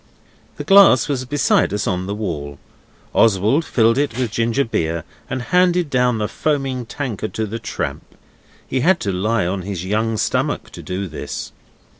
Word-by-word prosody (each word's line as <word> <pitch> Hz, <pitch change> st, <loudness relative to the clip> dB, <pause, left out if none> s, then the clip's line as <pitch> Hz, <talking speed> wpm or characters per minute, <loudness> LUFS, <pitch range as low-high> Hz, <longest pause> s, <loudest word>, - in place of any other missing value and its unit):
The -, -, -6 dB
glass 195 Hz, -, +6 dB
was 135 Hz, -3 st, -2 dB
beside 145 Hz, +3 st, +2 dB
us 105 Hz, +1 st, -1 dB
on 95 Hz, -5 st, -1 dB
the 100 Hz, -, -3 dB
wall. 75 Hz, -9 st, -4 dB, 0.6 s
Oswald 110 Hz, -, +3 dB
filled 115 Hz, -3 st, +2 dB
it 140 Hz, -5 st, -1 dB
with 125 Hz, -4 st, -1 dB
ginger 115 Hz, +5 st, +1 dB
beer 85 Hz, -7 st, -2 dB, 0.3 s
and 130 Hz, -2 st, -3 dB
handed 180 Hz, 0 st, +2 dB
down 125 Hz, -2 st, +2 dB
the 105 Hz, -1 st, -1 dB
foaming 135 Hz, -5 st, -2 dB
tankard 110 Hz, -5 st, -4 dB
to 110 Hz, -, -1 dB
the 110 Hz, +2 st, -5 dB
tramp. -, -, -5 dB, 0.5 s
He 130 Hz, -, -1 dB
had 175 Hz, +6 st, +3 dB
to 100 Hz, -, -1 dB
lie 105 Hz, +2 st, 0 dB
on 95 Hz, +2 st, -2 dB
his 95 Hz, -1 st, -5 dB
young 110 Hz, +3 st, 0 dB
stomach -, -, -1 dB
to -, -, -9 dB
do 95 Hz, +2 st, -4 dB
this. 80 Hz, -, -6 dB
115 Hz, 170 wpm, -20 LUFS, 100-135 Hz, 0.6 s, glass